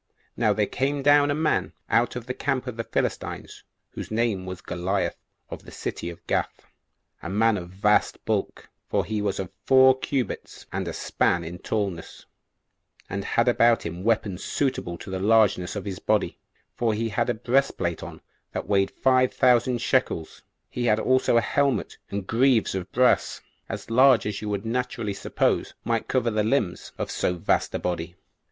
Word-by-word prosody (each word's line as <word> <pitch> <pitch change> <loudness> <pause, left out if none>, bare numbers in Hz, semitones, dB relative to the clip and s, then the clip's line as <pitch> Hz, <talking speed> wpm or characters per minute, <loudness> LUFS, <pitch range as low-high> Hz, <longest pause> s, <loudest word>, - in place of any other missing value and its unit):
Now - - +2
there - - +2
came 140 +2 -1
down 145 0 +5
a 145 - +1
man 155 0 0
out 120 +1 +2
of 125 -2 -5
the 125 - -3
camp 130 0 -1
of 125 -3 -5
the 115 - -3
Philistines, - - -3 0.3
whose - - -7
name 110 -4 -1
was 95 -1 -6
Goliath, 95 +3 -2 0.4
of - - -7
the - - -12
city 85 - -5
of 85 - -11
Gath, - - -2 0.6
a 85 - -6
man 110 +3 +3
of 90 -3 -5
vast 100 +3 +1
bulk, - - -2 0.2
for - - +1
he 110 -1 -2
was 100 -2 -1
of 95 -2 -4 0.2
four 130 0 +6
cubits 130 -2 -3
and - - -3
a - - -2
span 85 -1 0
in 85 +2 -7
tallness, 100 -6 -4 0.9
and 100 0 -2
had 115 +4 +1
about 120 -1 +4
him 85 +2 -5
weapons 105 -4 0
suitable 125 -11 -2
to 95 - -9
the 95 - -2
largeness 105 -3 +3
of 100 - -4
his 95 -2 -5
body, - - 0 0.3
for 115 -3 0
he 115 +1 -1
had 120 +3 0
a 120 - +1
breastplate 120 - 0
on - - -9 0.3
that - - -4
weighed 95 -1 +2
five 130 -1 +2
thousand 125 -1 +3
shekels: 115 -11 0 0.3
he 125 - -3
had 110 -2 +3
also 130 0 +3
a - - +5
helmet 140 -3 0
and 100 -1 -4
greaves 120 +1 +3
of 95 -1 -4
brass, 125 +1 +2 0.3
as - - -6
large 130 0 +5
as 105 -1 -3
you 105 - -4
would 100 +1 -3
naturally 120 -2 -2
suppose - - -1
might 115 -1 -1
cover 125 -3 +1
the 105 -1 +1
limbs 110 -5 -1
of - - -3
so 90 - 0
vast 85 - 0
a - - -1
body. 85 -1 -3
110 Hz, 180 wpm, -25 LUFS, 95-125 Hz, 0.9 s, four